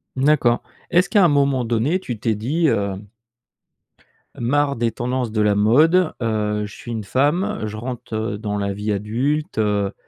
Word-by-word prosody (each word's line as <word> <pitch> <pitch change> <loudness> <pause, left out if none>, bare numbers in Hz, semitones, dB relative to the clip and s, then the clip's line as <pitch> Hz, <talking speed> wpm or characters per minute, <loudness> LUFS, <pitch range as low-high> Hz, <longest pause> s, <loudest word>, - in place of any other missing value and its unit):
D'accord, 130 -3 +2 0.3
est-ce 180 +1 +3
qu'à 200 -5 +5
un - - +6
moment 140 -4 +2
donné 120 +11 +1
tu 120 - -5
t'es 110 0 0
dit, 150 +9 0
heu 100 -1 0 1.4
«Marre 140 +4 +1
des 115 -1 0
tendances 125 0 -2
de 110 -1 0
la 105 -1 +3
mode. 155 - +4
Heu, 105 -2 -1
je 105 - -10
suis 120 - -9
une 110 -3 -4
femme, 145 - 0
je 105 +1 -6
rentre, 120 -1 -6
heu, 110 -1 -2
dans 105 -1 -3
la 100 -1 -2
vie 105 +2 -3
adulte, 125 - -1
heu, 105 -2 0
120 Hz, 175 wpm, -21 LUFS, 105-145 Hz, 1.4 s, un